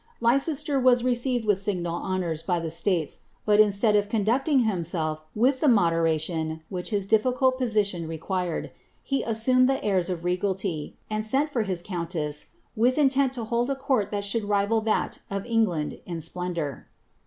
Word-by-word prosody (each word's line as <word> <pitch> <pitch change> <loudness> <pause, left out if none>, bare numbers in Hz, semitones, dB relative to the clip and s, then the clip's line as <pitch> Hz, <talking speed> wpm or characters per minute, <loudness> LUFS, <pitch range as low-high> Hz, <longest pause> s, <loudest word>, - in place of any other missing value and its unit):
Leicester 275 +4 +1
was 250 -2 +4
received 245 -1 0
with 205 -2 +2
signal 180 -4 -2
honours 175 -3 -2
by 175 0 0
the 165 -1 -4
states, 165 -2 -1 0.3
bat 210 0 +4
instead 210 +1 +4
of 205 0 +2
conducting 250 +7 +2
himself 170 -7 -1
with 255 +5 +2
the 300 - +2
moderation 165 - +1
which 180 -2 -4
his 205 -3 -1
difficult 255 +5 +2
position 205 -8 0
required, 170 +1 -3 0.3
he 275 -1 0
assumed 255 +3 +3
the 270 - 0
airs 190 -3 +1
of 175 -2 -3
regality, 180 -3 -2
and 215 0 -2
sent 275 +7 +1
for 245 - 0
hit 185 -5 -3
countess, 170 -5 -4 0.3
with 245 +4 +2
intent 275 -2 +3
to 245 -3 -5
hold 235 +3 0
a 275 - 0
court 265 -6 0
that 205 -1 -2
should 205 +1 -1
rival 205 +2 +1
that 215 0 -1
of 195 0 -3
EngUad 215 -10 0
in 170 -2 -4
splendour.' 165 -3 -4
205 Hz, 165 wpm, -26 LUFS, 175-240 Hz, 0.3 s, was